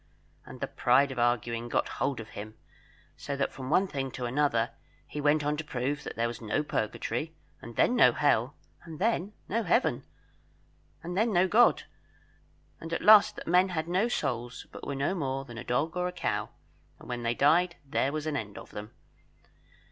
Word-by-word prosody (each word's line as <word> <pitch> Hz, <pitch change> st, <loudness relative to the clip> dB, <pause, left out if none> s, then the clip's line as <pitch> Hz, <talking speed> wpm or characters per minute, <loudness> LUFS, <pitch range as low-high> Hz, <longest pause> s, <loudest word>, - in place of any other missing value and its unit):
And -, -, -11 dB
the -, -, -1 dB
pride 135 Hz, +3 st, +3 dB
of 130 Hz, -, -5 dB
arguing 120 Hz, 0 st, 0 dB
got -, -, +1 dB
hold 140 Hz, -3 st, 0 dB
of 110 Hz, -1 st, -8 dB
him, 110 Hz, +1 st, -9 dB, 0.6 s
so 140 Hz, -, -5 dB
that 140 Hz, -, -1 dB
from 130 Hz, -1 st, -7 dB
one 185 Hz, +5 st, +4 dB
thing 135 Hz, -7 st, -3 dB
to 125 Hz, -, -4 dB
another 125 Hz, -2 st, +1 dB, 0.3 s
he 150 Hz, -, -6 dB
went 150 Hz, +1 st, +3 dB
on 150 Hz, +1 st, 0 dB
to 160 Hz, -, -3 dB
prove 145 Hz, +1 st, -3 dB
that -, -, -6 dB
there 115 Hz, +1 st, 0 dB
was 115 Hz, 0 st, -7 dB
no 115 Hz, +7 st, -1 dB
Purgatory, 145 Hz, +4 st, -3 dB, 0.3 s
and 115 Hz, 0 st, -10 dB
then 245 Hz, -, +3 dB
no 245 Hz, -, +7 dB
Hell, -, -, +1 dB, 0.3 s
and 165 Hz, -2 st, -9 dB
then 210 Hz, 0 st, 0 dB
no 230 Hz, +4 st, 0 dB
Heaven, 220 Hz, +5 st, +1 dB, 1.0 s
and 175 Hz, +1 st, -5 dB
then 220 Hz, +4 st, +2 dB
no 185 Hz, -1 st, +4 dB
God; 230 Hz, +6 st, +4 dB, 1.0 s
and 165 Hz, -, -8 dB
at 165 Hz, -, -2 dB
last 210 Hz, 0 st, +7 dB
that -, -, -8 dB
men 180 Hz, +3 st, +4 dB
had 160 Hz, -3 st, -2 dB
no 185 Hz, +6 st, +2 dB
souls, 120 Hz, -, -3 dB
but -, -, -9 dB
were 140 Hz, -, -3 dB
no 140 Hz, +6 st, 0 dB
more 135 Hz, -6 st, -2 dB
than 120 Hz, -2 st, -9 dB
a -, -, -6 dB
dog 145 Hz, +7 st, -1 dB
or 180 Hz, 0 st, 0 dB
a -, -, -3 dB
cow, 180 Hz, -, -2 dB, 0.5 s
and -, -, -14 dB
when 120 Hz, -1 st, -4 dB
they 120 Hz, 0 st, 0 dB
died 170 Hz, +6 st, +3 dB
there 135 Hz, 0 st, 0 dB
was 155 Hz, 0 st, -3 dB
an 155 Hz, -2 st, -2 dB
end 105 Hz, -6 st, -5 dB
of -, -, -11 dB
them. 105 Hz, +1 st, -8 dB
145 Hz, 200 wpm, -29 LUFS, 120-175 Hz, 1.0 s, no